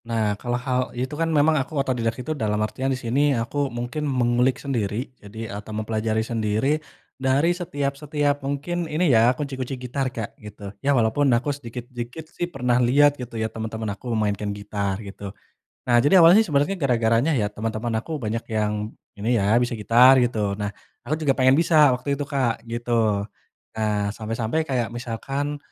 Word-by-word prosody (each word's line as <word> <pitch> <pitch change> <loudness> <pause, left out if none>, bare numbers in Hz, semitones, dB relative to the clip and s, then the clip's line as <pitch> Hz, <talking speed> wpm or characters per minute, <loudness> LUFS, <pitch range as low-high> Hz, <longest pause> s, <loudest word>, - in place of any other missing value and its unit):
Nah 110 -3 +1
kalau 120 -1 -1
hal 130 -1 +1 0.2
itu 130 +3 -3
kan 165 - +1
memang 155 0 +4
aku 145 +3 -6
otodidak 125 -4 0
itu, 155 +5 -3
dalam 110 -7 -1
artian 130 +5 -3
di 130 - 0
sini 125 +2 0 0.2
aku 140 +5 -1
mungkin 120 +5 -3
mengulik 125 0 +2
sendiri 120 -2 -3
jadi 110 +2 -7
atau 105 +1 -7
mempelajari 110 0 -1
sendiri 115 +6 0 0.4
dari 140 +6 +3
setiap 145 -6 -3
setiap 145 -1 0
mungkin 150 +5 -3
ini 155 -1 +2
ya, 115 +1 +6
kunci-kunci 135 -2 -4
gitar 130 +2 -2
Kak 115 -4 -6
gitu. 105 -1 -9
Iya 140 -1 +2
walaupun 120 +5 +2
aku 145 +4 -1
sedikit-sedikit 125 +2 -7
sih 175 - -3
pernah 125 -5 +1
lihat 140 +4 +5
gitu 120 -2 -7
ya, 110 - 0
teman-teman 110 -1 -4
aku 120 +5 -9
memainkan 105 -1 -1
gitar 100 -1 -2
gitu. 100 0 -7 0.5
Nah 120 -1 +2
jadi 145 +9 +4
awalnya 190 +7 +7
sebenarnya 145 +5 +1
gara-garanya 120 -1 +2
ya 105 -5 0
teman-teman 110 +2 -2
aku 115 - -8
banyak 115 +1 -2
yang 105 0 -1 0.2
ini 115 +4 +1
ya, 105 +3 +3
bisa 120 0 -1
gitar 120 +4 +6
gitu. 110 -5 0
Nah 105 0 -3 0.3
aku 130 +6 -2
juga 135 - +4
pengen 130 +1 +4
bisa 155 -4 +5
waktu 135 +3 -2
itu 140 - -3
Kak, 135 -5 -1
gitu. 115 -4 0 0.5
Nah 110 -1 0 0.2
sampai-sampai 115 +7 -1
kayak 125 -4 0
misalkan, 135 +5 -3
120 Hz, 170 wpm, -24 LUFS, 110-140 Hz, 0.5 s, awalnya